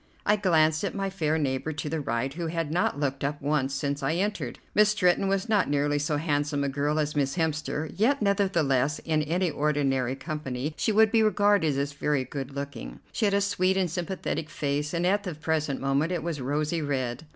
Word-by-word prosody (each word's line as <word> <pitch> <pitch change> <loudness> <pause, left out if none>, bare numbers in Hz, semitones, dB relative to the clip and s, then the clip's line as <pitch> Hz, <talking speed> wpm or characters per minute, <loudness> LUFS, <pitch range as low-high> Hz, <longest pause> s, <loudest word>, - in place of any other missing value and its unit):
I 210 - +4
glanced 160 -5 +3
at 200 - -2
my 195 -1 -2
fair 160 -4 0
neighbor 140 0 -1
to 150 - -4
the 155 +1 -2
right, 125 +2 -2
who 170 +1 -3
had 165 -2 -2
not 165 -4 0
looked 135 -1 -1
up 145 +1 -1
once 140 -2 0
since 140 +1 -2
I 135 +3 0
entered. 205 +3 -2 0.2
Miss 210 0 +5
Stretton 195 -2 +2
was 195 +2 0
not 210 -7 +2
nearly 145 0 +1
so 150 0 0
handsome 145 -2 0
a 140 - 0
girl 145 +2 0
as 150 -1 -1
Miss 140 -2 0
Hemster, 155 -2 -2
yet 260 +8 +2
nevertheless 165 - +2
in 155 -2 0
any 170 +3 0
ordinary 135 -4 0
company 150 -2 -4
she - - 0
would 220 0 +5
be 225 - +4
regarded 205 -8 +3
as 140 +1 -1
very 145 -1 0
good 135 +1 -6
looking. 140 - -6
She - - 0
had 200 -1 +2
a 200 - +3
sweet 190 -1 +1
and 185 -4 +1
sympathetic 175 -3 -3
face, 145 0 -2
and 170 0 -1
at 200 +3 +2
the 180 -5 -5
present 155 -2 -1
moment 140 +5 +1
it 175 -3 -2
was 165 -5 -3
rosy 150 +5 -1
red. 135 0 -2
155 Hz, 205 wpm, -27 LUFS, 140-180 Hz, 0.2 s, Miss